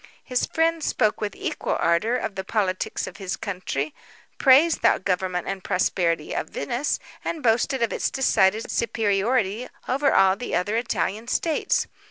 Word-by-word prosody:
His 250 -1 -1
friend 325 0 +1
spoke 215 -6 +1
with 210 -1 -3
equal - - -2
ardour, 185 +9 +2
of 220 - -2
the 190 0 -4
politics 190 -2 -1
of - - -9
his 190 -2 -4
country; 155 -7 -3 0.5
praised 290 +5 +5
the - - +4
government 185 -1 -1
and 195 -1 -4
prosperity 170 -4 0
of - - -3
Venice, 240 - -2 0.3
and 320 -3 -4
boasted 240 +3 +2
of 230 - 0
its - - 0
decided 220 -5 +2
superiority 220 0 0 0.2
over 275 +2 +2
all 190 0 +5
the 245 +5 -4
other 205 +5 0
Italian 225 -2 -1
states. 315 +5 +1
215 Hz, 155 wpm, -24 LUFS, 190-250 Hz, 0.5 s, praised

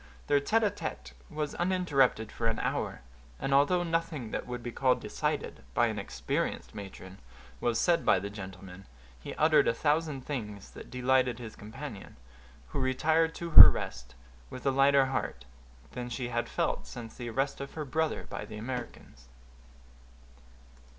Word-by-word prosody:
Their 145 -1 +3
tête 225 +10 +2
à 205 - +3
tête 70 - -6 0.2
was 150 -1 -3
uninterrupted 145 -11 +2
for 115 - -2
an 115 - 0
hour; - - -2 0.4
and 135 - -1
although 160 +6 +4
nothing 165 -8 -2
that - - -4
would 125 -1 -5
be 120 - -4
called 130 +1 +2
decided, - - -3
by - - +4
an - - -2
experienced - - -3
matron, 95 -2 -9 0.4
was 120 -1 0
said 170 -1 +3
by - - +4
the 100 +2 -4
gentleman, 95 -2 -10 0.3
he - - -7
uttered 155 -2 +4
a 115 - +2
thousand 150 -1 0
things 105 -8 -5
that - - -11
delighted 125 -1 +2
his 115 -3 -8
companion, 110 +1 -9 0.5
who 145 - -3
retired 160 +5 +2
to 170 -1 -5
her - - +13
rest 60 0 -6 0.3
with 130 - -9
a 135 - +4
lighter 135 0 +5
heart 65 - -3 0.5
than 125 -1 -5
she 120 +1 -4
had 120 0 -2
felt - - -1
since 115 -2 -8
the 120 -2 -6
arrest 135 +4 -1
of 140 - -7
her 155 -2 -4
brother 160 +3 -1
by - - -6
the 105 - -8
Americans. 115 - -7
130 Hz, 165 wpm, -30 LUFS, 110-150 Hz, 0.5 s, her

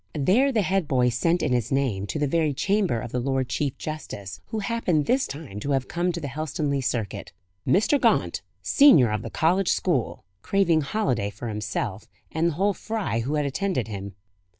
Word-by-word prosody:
There 215 - +3
the 220 -5 +2
head 190 -3 0
boy 125 -3 +3
sent 165 +9 +1
in - - +1
his 120 -1 0
name 125 -8 0
to 155 - -3
the 150 - +1
very 155 0 +1
chamber 195 - +1
of 120 0 -7
the 125 - -1
Lord 130 0 -1
Chief 140 0 -2
Justice, 105 -11 -6
who 220 - -4
happened 200 -8 0
this 260 +2 +2
time 140 -8 -7
to 140 +6 -1
have 135 -1 0
come 175 +1 0
to 170 - -4
the 150 - -5
Helstonleigh 145 0 -2
circuit. 120 -8 -3 0.3
"Mr. 215 - +3
Gaunt, - - +2 0.2
senior 255 - +6
of 105 - -1
the - - -6
college 180 +4 +2
school" 150 -11 0 0.2
craving 175 - +2
holiday 140 - -1
for 105 +4 -7
himself, 105 -1 -4 0.2
and 160 +2 +1
the 170 - 0
whole 200 +6 +1
fry 215 - -2
who 135 +6 -2
had 150 -1 0
attended 140 - -1
him. 100 -2 -6
145 Hz, 195 wpm, -25 LUFS, 125-185 Hz, 0.3 s, senior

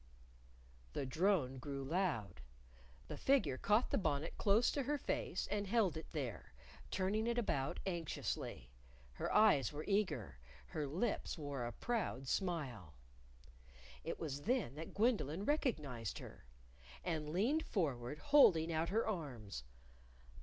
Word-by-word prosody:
_ - - -26
The 140 - -1
drone 155 -3 +2
grew 140 +1 -4
loud. 135 - -1 0.7
The - - -6
figure 160 - +2
caught 210 +4 +3
the - - +2
bonnet 155 -3 -1
close 210 +4 +4
to 285 - 0
her 290 +3 0
face 190 - -2
and 205 -1 0
held 205 -5 +3
it 160 - -6
there, 130 - -4 0.4
turning 205 +4 0
it 235 0 0
about 140 - 0
anxiously. 165 - -3 0.4
Her - - -3
eyes 170 - +5
were 150 +1 -5
eager. 125 - 0 0.3
Her 150 -2 -2
lips 185 +10 -1
wore 140 -5 -3
a - - -4
proud 180 - -2
smile. 130 - -2 1.1
It - - -4
was 145 -3 -3
then 230 - +1
that 160 +3 -8
Gwendolyn 200 - +1
recognized 150 - -1
her. - - -10 0.6
And 150 - -2
leaned 225 - +2
forward, 145 - -1
holding 170 - +5
out 160 +1 +1
her 220 +4 +2
arms. 125 - -4
160 Hz, 135 wpm, -38 LUFS, 135-210 Hz, 1.1 s, eyes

